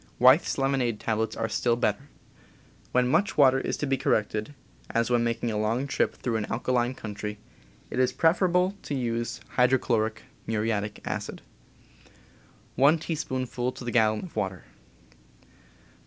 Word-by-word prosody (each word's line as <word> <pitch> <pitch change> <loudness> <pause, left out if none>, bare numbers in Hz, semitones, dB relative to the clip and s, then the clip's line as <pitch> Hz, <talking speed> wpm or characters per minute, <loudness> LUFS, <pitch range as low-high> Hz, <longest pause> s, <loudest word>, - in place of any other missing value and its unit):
Wyeth's 130 +6 +5
lemonade 135 -5 0
tablets 110 0 -1
are 115 - -1
still 120 +1 +1
better. 120 +3 -1 0.8
When 125 0 +3
much 195 +10 +1
water 135 -2 +6
is - - -2
to - - -2
be 135 -1 +1
corrected, 110 +5 -1 0.3
as 115 +1 0
when 120 -1 +3
making 115 0 -1
a 105 - -1
long 115 +5 0
trip 140 - 0
through 115 -3 -2
an 105 - -2
alkaline 125 +1 0
country, 105 -1 -6 0.5
it - - -2
is 130 -1 +3
preferable 180 +3 +2
to 145 - -4
use 120 -2 -2 0.2
hydrochloric 120 -3 +2 0.2
(muriatic) 105 -1 -2
acid, - - -4 1.3
one 140 +5 +5
teaspoonful 130 -6 -3
to - - -9
the 120 - -2
gallon 110 -2 +3
of 180 - -10
water. 95 -2 -3
120 Hz, 140 wpm, -27 LUFS, 110-135 Hz, 1.3 s, water